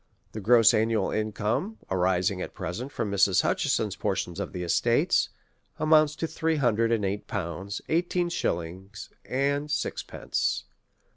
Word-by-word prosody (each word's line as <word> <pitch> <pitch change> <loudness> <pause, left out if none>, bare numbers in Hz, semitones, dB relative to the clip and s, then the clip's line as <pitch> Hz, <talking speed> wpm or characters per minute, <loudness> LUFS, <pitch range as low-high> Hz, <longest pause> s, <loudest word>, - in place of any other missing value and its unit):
The 110 - -6
gross 115 +2 +6
annual 110 -2 +1
income 110 - -1
arising 90 0 +1
at - - -6
present 120 - -5
from 105 -7 -3
Mrs. 100 -2 +4
Hutcheson's 105 -4 0
portion 95 -1 -2
of - - -5
the 90 -1 -4
estates, 85 - +2 0.5
amounts 155 -1 +4
to 165 - -2
three 160 0 -1
hundred 115 -5 +2
and 110 -3 +1
eight 100 +2 -3
pounds, 100 +1 -4
eighteen 175 +1 0
shillings^ 95 - -4 0.2
and 140 +3 0
sixpence. 150 -1 -2
110 Hz, 135 wpm, -27 LUFS, 95-140 Hz, 0.5 s, gross